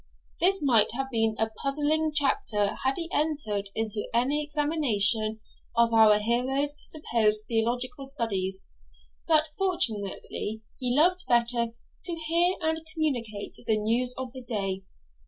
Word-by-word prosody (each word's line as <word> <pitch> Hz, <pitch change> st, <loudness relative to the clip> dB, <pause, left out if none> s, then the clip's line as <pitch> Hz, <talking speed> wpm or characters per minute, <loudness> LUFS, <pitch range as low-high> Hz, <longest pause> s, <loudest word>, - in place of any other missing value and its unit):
This 380 Hz, -1 st, +2 dB
might 235 Hz, -6 st, +4 dB
have 270 Hz, +1 st, -3 dB
been 225 Hz, -2 st, +1 dB
a 220 Hz, 0 st, 0 dB
puzzling 300 Hz, +3 st, +1 dB
chapter 275 Hz, -, 0 dB
had 265 Hz, +1 st, +2 dB
he 335 Hz, -1 st, -4 dB
entered 220 Hz, -11 st, -1 dB
into 220 Hz, -1 st, -1 dB
any 275 Hz, +5 st, +2 dB
examination 235 Hz, -8 st, +2 dB, 0.4 s
of 235 Hz, 0 st, +4 dB
our 220 Hz, -2 st, +7 dB
hero's 260 Hz, +6 st, 0 dB
supposed 220 Hz, -8 st, 0 dB
theological 245 Hz, +4 st, -1 dB
studies; 195 Hz, -8 st, -2 dB, 0.6 s
but 310 Hz, -1 st, +3 dB
fortunately 220 Hz, -, -2 dB, 0.2 s
he 250 Hz, 0 st, 0 dB
loved 360 Hz, +4 st, +3 dB
better 235 Hz, -1 st, +1 dB, 0.3 s
to 345 Hz, -, 0 dB
hear 335 Hz, +3 st, +2 dB
and 320 Hz, 0 st, 0 dB
communicate 240 Hz, -10 st, -2 dB
the 220 Hz, -, +3 dB
news 240 Hz, +4 st, +1 dB
of 255 Hz, -2 st, -5 dB
the 260 Hz, -, -8 dB
day. 195 Hz, -5 st, -2 dB
245 Hz, 130 wpm, -27 LUFS, 220-300 Hz, 0.6 s, our